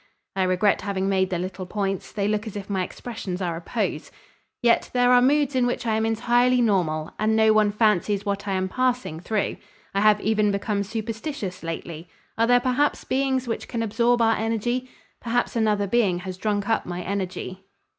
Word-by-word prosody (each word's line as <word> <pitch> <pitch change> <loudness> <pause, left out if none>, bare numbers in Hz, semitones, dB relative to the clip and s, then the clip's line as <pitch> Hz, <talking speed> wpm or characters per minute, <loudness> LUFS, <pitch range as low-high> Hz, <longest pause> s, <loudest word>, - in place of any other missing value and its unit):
(I 190 - 0
regret 185 +2 +2
having 195 -1 -2
made 190 -1 +2
the 180 - -1
little 185 +1 -5
points. 195 -1 -3
They 200 -1 -1
look 215 +1 -1
as 210 - -7
if 200 0 -6
my 190 -2 0
expressions 195 -3 -6
are 175 -3 -2
a 165 - -6
pose.) - - -3 0.5
Yet 235 -1 +3
there 245 0 +4
are 250 0 +6
moods 285 +1 +2
in 250 -1 +3
which 245 - -2
I 225 - +1
am 220 0 +1
entirely 245 +2 +3
normal 175 -9 +1
and 220 +1 +2
no 220 0 +5
one 215 -1 +3
fancies 205 -1 +1
what 200 0 -2
I 195 - 0
am 190 0 0
passing 250 -7 -1
through. 210 +3 -2 0.4
I 195 - +1
have 210 0 +5
even 215 0 +2
become 200 +1 -1
superstitious 220 - -4
lately. 165 0 -6 0.3
Are 230 +1 +2
there 245 0 +5
perhaps 255 +4 +1
beings 265 -1 0
which 230 - -3
can 230 -2 -2
absorb 235 +2 +2
our 225 0 +3
energy? 235 +3 -1 0.3
Perhaps 245 +1 -1
another 210 -3 +2
being 195 -4 +1
has 185 -1 -6
drunk 205 +1 -1
up 225 - 0
my 175 0 -4
energy." 190 -1 -4
210 Hz, 195 wpm, -24 LUFS, 190-235 Hz, 0.5 s, are